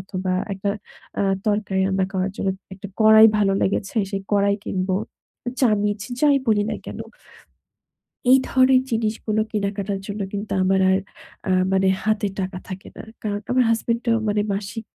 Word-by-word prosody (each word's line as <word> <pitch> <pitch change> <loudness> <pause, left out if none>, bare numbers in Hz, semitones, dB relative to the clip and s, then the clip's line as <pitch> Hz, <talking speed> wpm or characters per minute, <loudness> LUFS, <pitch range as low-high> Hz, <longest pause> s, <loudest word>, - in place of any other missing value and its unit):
অথবা 185 0 -3 0.2
একটা 195 +1 -2 0.5
আ - - +2 0.2
তরকারি 205 -2 0
রান্না 190 0 +1
খাওয়ার 190 0 -1
জন্য 195 - -1 0.3
একটা 195 +2 -9
কড়াই 220 0 +8
ভালো 195 -2 +3
লেগেছে 195 +3 -1
সেই 195 -1 -3
কড়াই 200 0 +3
কিনবো। 185 0 -1 0.6
চামিচ 210 -4 +2 0.2
যাই 290 -2 +5
বলি 210 -2 +3
না - - -2
কেন। - - -7 1.3
এই 265 - +8
ধরনের 260 0 +4
জিনিসগুলো 220 -1 -1
কেনাকাটার 200 -1 -2
জন্য 205 +1 -5
কিন্তু 205 +1 -4
আমার 190 +1 +2
আর 190 - +3 0.5
আ - - +1 0.2
মানে 190 0 +3 0.2
হাতে 215 -1 +1
টাকা 185 0 -3
থাকে 190 0 -8
না। - - -7 0.2
কারণ 205 -1 -2
আমার 250 0 +3
হাসব্যান্ড 230 +1 0
এর 230 - +4
মানে 210 0 +1
মাসিক 210 +3 -5
205 Hz, 155 wpm, -22 LUFS, 195-220 Hz, 1.3 s, কড়াই